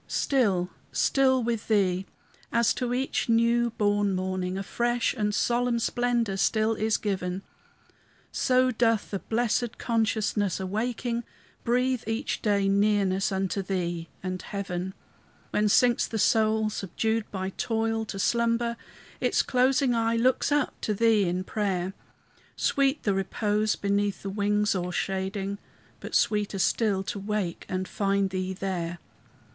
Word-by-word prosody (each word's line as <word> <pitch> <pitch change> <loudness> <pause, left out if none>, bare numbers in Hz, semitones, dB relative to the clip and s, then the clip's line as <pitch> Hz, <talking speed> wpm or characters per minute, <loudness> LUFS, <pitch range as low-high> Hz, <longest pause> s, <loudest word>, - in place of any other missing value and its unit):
Still, 195 -10 +1 0.2
still 260 -2 +3
with 230 -2 -2
Thee! 190 -3 +1 0.4
as 235 -1 +3
to 250 -2 -2
each 255 0 -1
new 235 +1 +3
born 205 -1 +2
morning 185 0 -2
A 195 - -3
fresh 240 +3 0
and 210 -4 0
solemn 240 +1 +1
splendor 235 -3 0
still 220 +3 +2
is 220 0 +1
given, 190 -2 -3 0.9
So 255 0 +2
doth 225 -2 +1
the 195 - -2
blessed 240 +2 -1
consciousness, 215 -4 0
awaking, 235 +5 -2 0.4
Breathe, 250 +1 +1
each 225 +5 -2
day, 200 -2 +2
nearness 200 -1 +2
unto 195 +1 -1
Thee 175 -3 -3
and 185 -1 -3
heaven. 190 -2 -4 0.6
When 210 0 +2
sinks 240 +3 +4
the 225 - -4
soul, 220 0 +2
subdued 220 +3 -2
by 190 -1 -4
toil, 225 +1 -1
to 205 - -6
slumber, 235 +2 +1 0.4
Its - - +2
closing 255 0 +2
eye 230 0 +1
looks 255 +4 +2
up 290 -1 0
to 210 - -1
Thee 220 -1 +3
in 180 +1 -1
prayer; 190 -2 -2 0.6
Sweet 275 +1 +1
the 200 - +2
repose 210 +2 0
beneath 200 -1 -1
the 195 - -3
wings 210 +1 +1
o'ershading, 190 +2 -2 0.4
But - - -6
sweeter 210 -2 +1
still 195 0 +1
to 200 - -4
wake 200 -4 -3
and 185 0 -2
find 195 -1 0
Thee 185 0 -2
there. 180 -3 -3
210 Hz, 135 wpm, -27 LUFS, 195-235 Hz, 0.9 s, sinks